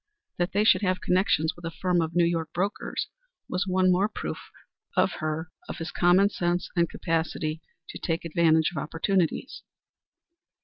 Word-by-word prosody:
That 175 0 +1
he 205 +2 +3
should 215 - +5
have 185 -2 +1
connections 180 -3 +1
with 175 - -15
a 165 - -2
firm 175 +1 0
of 160 0 -3
New 175 -1 +5
York 165 -2 -1
brokers 195 +3 -2 0.4
was 185 +2 -2
one 185 0 +3
more 190 +4 +2
proof - - -6 0.5
to - - +6
her 160 -2 -4 0.2
of - - -5
his 165 0 -5
common 185 +3 +4
sense 175 -1 -1
and 170 -1 +2
capacity 160 -1 -2 0.3
to - - -7
take 165 0 -2
advantage 160 -1 +3
of 175 - -8
opportunities. 175 - -1
175 Hz, 165 wpm, -27 LUFS, 160-185 Hz, 0.5 s, to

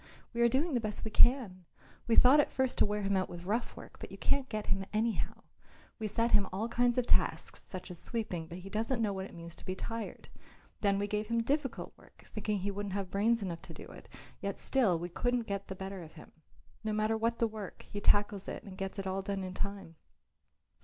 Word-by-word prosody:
"We 235 - 0
are 235 - +6
doing 290 +6 +2
the 245 - +3
best 215 -1 -1
we 220 - -3
can. 210 -8 +5 0.4
We 230 - +4
thought 265 +4 +8
at 295 - +4
first 260 -1 +1
to - - +6
wear 210 0 -1
him 195 0 +2
out 185 -1 +1
with 175 0 -7
rough 225 +5 -1
work, - - -11
but - - -8
you - - -8
can't 275 -2 +2
get 215 -1 -3
him 195 0 +1
anyhow. 220 +1 -1 0.6
We 220 - -1
set 230 +3 +1
him 200 -2 +5
all 200 +5 -1
kinds 240 +1 +2
of 250 - +3
tasks, - - +2
such 185 -1 -7
as 175 - -7
sweeping, 200 -8 -2
but 170 - -7
he 185 +1 -9
doesn't 230 +3 0
know 210 -3 +1
what 190 0 -4
it - - -14
means 170 0 -8
to - - -12
be 185 - -3
tired. 225 +3 -5 0.5
Then 200 -1 +3
we 200 - +1
gave 210 +1 -1
him 230 0 +1
difficult 275 0 -1
work, - - -19
thinking 210 -1 -1
that 190 - -5
he 200 - 0
wouldn't 200 -1 -4
have 195 -2 -3
brains 220 +3 +3
enough 170 -3 -4
to - - -10
do - - -9
it, - - -12 0.3
yet 200 -1 -3
still, 230 -10 +3
we 170 +2 -3
couldn't 245 +7 0
get 200 -1 -3
the 190 - -5
better 190 0 -5
of 160 -2 -11
him. 155 - -13 0.5
No 215 -1 -1
matter 215 +1 +2
what 230 +1 +1
the 230 - +3
work, 215 -3 -6
he 205 - -5
tackles 205 -1 +3
it - - -5
and 190 -1 -10
gets 195 +1 -3
it 195 - -3
all 190 +1 -1
done 195 0 -2
in 185 0 -4
time. 195 -5 -4
205 Hz, 240 wpm, -33 LUFS, 190-230 Hz, 0.6 s, thought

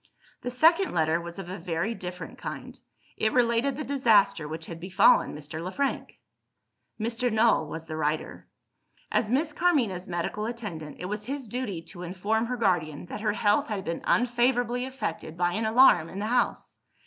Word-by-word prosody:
The 245 - -3
second 330 +9 +4
letter 160 0 +2
was 170 +1 -8
of 195 -3 -6
a 185 +1 -6
very 170 +5 -2
different 180 -3 -8
kind. - - -7 0.4
It 220 0 +1
related 245 +2 +2
the 305 - -3
disaster 210 - +3
which 160 +1 -6
had 165 0 -8
befallen 185 -1 +4
Mr. 150 +2 -7
Le 180 +2 -4
Frank. 280 +4 -2 0.8
Mr. 235 +2 0
Null 220 -7 +3
was 160 +2 -6
the 160 -1 -6
writer. 155 0 -2 0.6
As 210 - +1
Miss 295 +5 +1
Carmina's 245 - +1
medical 180 +5 -2
attendant, 195 -11 -6
it - - -5
was 210 +2 -4
his 275 -1 -4
duty 210 -7 -4
to 175 +1 -11
inform 205 +6 -1
her 250 +1 -2
guardian 175 -9 0
that 205 +4 -7
her 215 -1 +1
health 205 0 +2
had 205 -4 -4
been 165 0 -3
unfavourably 245 0 +2
affected 170 -11 -5
by 175 0 +1
an 220 +2 -1
alarm 220 -8 +6
in - - -8
the 205 - -2
house. 245 +3 -1
210 Hz, 175 wpm, -27 LUFS, 170-245 Hz, 0.8 s, alarm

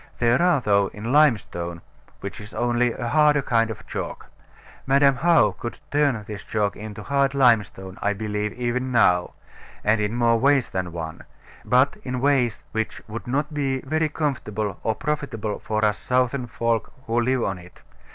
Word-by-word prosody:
There 120 +4 +3
are, 175 -4 +4
though, 100 -3 +3
in 110 +3 -4
limestone, 100 - +2 0.4
which 100 +2 -6
is 105 +1 -11
only 120 0 +1
a 120 0 -4
harder 150 +1 +4
kind 115 -2 +2
of 110 - -7
chalk. - - -6 0.6
Madam 140 0 +4
How 150 -7 +4
could 120 +5 -7
turn 140 -7 +1
this 105 -1 -7
chalk 105 -2 -1
into 105 -1 -8
hard 140 -1 +1
limestone, 105 - +2
I 105 - +1
believe, 105 0 -3
even 125 +1 -2
now; 90 -7 +3 0.5
and 105 +1 +2
in 105 +2 -1
more 115 -1 +3
ways 140 -1 +3
than 90 -2 -3
one: 80 0 -6 0.4
but 130 +3 +3
in 125 -1 -3
ways 130 -4 +1
which 110 0 -3
would 115 +3 -7
not 145 +4 -1
be 135 -3 -1
very 155 +3 0
comfortable 110 -10 -3
or 110 - 0
profitable 135 -8 -3
for 110 0 -1
us 105 0 +1
Southern 125 0 0
folk 115 -1 -1
who 115 +1 +1
live 130 0 +1
on 95 -2 -2
it. 90 0 -16
120 Hz, 170 wpm, -24 LUFS, 105-135 Hz, 0.6 s, are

